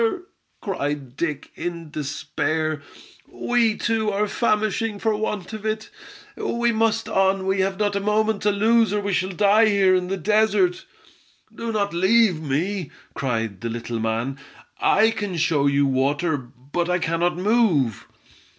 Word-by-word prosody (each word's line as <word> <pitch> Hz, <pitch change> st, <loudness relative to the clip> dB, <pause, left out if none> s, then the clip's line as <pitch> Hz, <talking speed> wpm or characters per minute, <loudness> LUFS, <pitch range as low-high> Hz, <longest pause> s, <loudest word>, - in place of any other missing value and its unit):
cried 145 Hz, -, -3 dB
Dick, 150 Hz, -2 st, -3 dB
in 170 Hz, -3 st, -6 dB
despair. 155 Hz, +1 st, -2 dB, 0.5 s
"We, 235 Hz, -3 st, +1 dB
too, 225 Hz, -2 st, 0 dB
are 210 Hz, +1 st, 0 dB
famishing 215 Hz, -1 st, 0 dB
for 220 Hz, +1 st, 0 dB
want 210 Hz, -2 st, -3 dB
of 215 Hz, -1 st, -6 dB
it! 220 Hz, 0 st, -3 dB, 0.4 s
We 235 Hz, 0 st, 0 dB
must 225 Hz, 0 st, +1 dB
on, 195 Hz, -2 st, +1 dB
we 190 Hz, 0 st, 0 dB
have 190 Hz, 0 st, 0 dB
not 205 Hz, -1 st, 0 dB
a -, -, +1 dB
moment 210 Hz, +1 st, +1 dB
to 210 Hz, -, +2 dB
lose, 220 Hz, +2 st, +3 dB
or 210 Hz, -, +1 dB
we 200 Hz, -1 st, -2 dB
shall 185 Hz, +1 st, 0 dB
die 205 Hz, +4 st, +4 dB
here 195 Hz, -2 st, +4 dB
in 180 Hz, -1 st, +1 dB
the 195 Hz, +1 st, -2 dB
desert." 205 Hz, -2 st, +2 dB, 0.7 s
"Do 230 Hz, 0 st, -4 dB
not 200 Hz, -4 st, -1 dB
leave 190 Hz, -1 st, +3 dB
me," 160 Hz, +4 st, -2 dB, 0.2 s
cried 115 Hz, -6 st, -2 dB
the 115 Hz, -, -3 dB
little 115 Hz, 0 st, -4 dB
man. 115 Hz, +5 st, -2 dB, 0.4 s
"I 220 Hz, +3 st, +4 dB
can 205 Hz, -5 st, -4 dB
show 155 Hz, -3 st, +2 dB
you 140 Hz, 0 st, +3 dB
water, 140 Hz, +5 st, +1 dB
but 140 Hz, +6 st, -5 dB
I 180 Hz, -, +2 dB
cannot 170 Hz, +1 st, 0 dB
move!" 180 Hz, -, +1 dB
190 Hz, 150 wpm, -23 LUFS, 150-215 Hz, 0.7 s, die